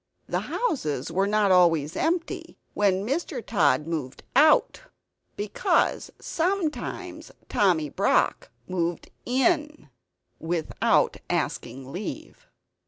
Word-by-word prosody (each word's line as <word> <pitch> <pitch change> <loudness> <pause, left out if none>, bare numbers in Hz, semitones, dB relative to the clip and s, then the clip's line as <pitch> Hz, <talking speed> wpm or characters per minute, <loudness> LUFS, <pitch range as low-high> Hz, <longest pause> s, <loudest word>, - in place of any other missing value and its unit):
The - - 0
houses 160 - -1
were 190 +4 +1
not 205 -1 +2
always 165 -4 +4
empty 335 +1 -2 0.2
when 195 -1 +1
Mr. 275 - -3
Tod 150 - +2
moved 155 -6 -5
OUT; 305 +3 +5 0.5
because 205 0 0
sometimes 340 -2 -3 0.2
Tommy 175 -7 +2
Brock - - +1 0.2
moved 175 -2 -2 0.2
IN; 300 - 0 0.5
(without 165 -1 +1
asking 130 +2 -3
leave). 215 - -7
195 Hz, 95 wpm, -26 LUFS, -, 0.5 s, OUT